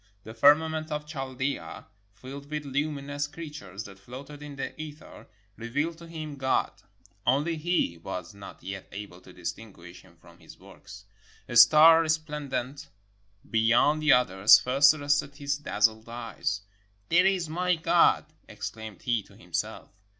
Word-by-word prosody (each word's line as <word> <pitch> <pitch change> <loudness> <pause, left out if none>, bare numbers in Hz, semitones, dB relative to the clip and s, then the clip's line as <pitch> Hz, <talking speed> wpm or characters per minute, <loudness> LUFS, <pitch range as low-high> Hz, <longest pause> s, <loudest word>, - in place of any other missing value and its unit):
The 110 - -9
firmament 155 +5 +3
of 150 0 -3
Chaldea, 135 -2 -5 0.3
filled 140 +7 -10
with 150 -1 -4
lumi 140 +1 -2
nous 145 +1 -3
creatures 145 - -8
that 95 -2 -13
floated 135 +7 -10
in 145 -1 -9
the 135 - -5
ether, 155 0 -11 0.3
revealed 145 +9 -3
to 170 - -11
him 155 -3 -7
God. 130 -1 0 0.5
Only 145 +8 +1
he 155 - -1
was 90 0 -6
not 100 -1 -12
yet 95 0 -7
able 100 -3 -9
to 90 - -15
distinguish 90 0 -9
him 90 -3 -22
from 85 +1 -19
his 80 - -15
works. 100 +1 -14 0.4
A 120 - -6
star 155 +8 +8
resplendent 150 -4 -3 0.6
beyond 120 +7 +3
the 155 -2 +4
others 100 -5 +6
first 135 +2 +5
arrested 145 -1 0
his 145 0 -2
dazzled 110 -4 0
eyes: 115 -4 -4 0.5
"There 180 +3 +5
is 185 -4 0
my 180 +3 0
God," 160 - +3 0.2
exclaimed 110 -3 -8
he 120 -3 +1
to 100 - -20
himself. - - -5
135 Hz, 145 wpm, -27 LUFS, 105-150 Hz, 0.6 s, star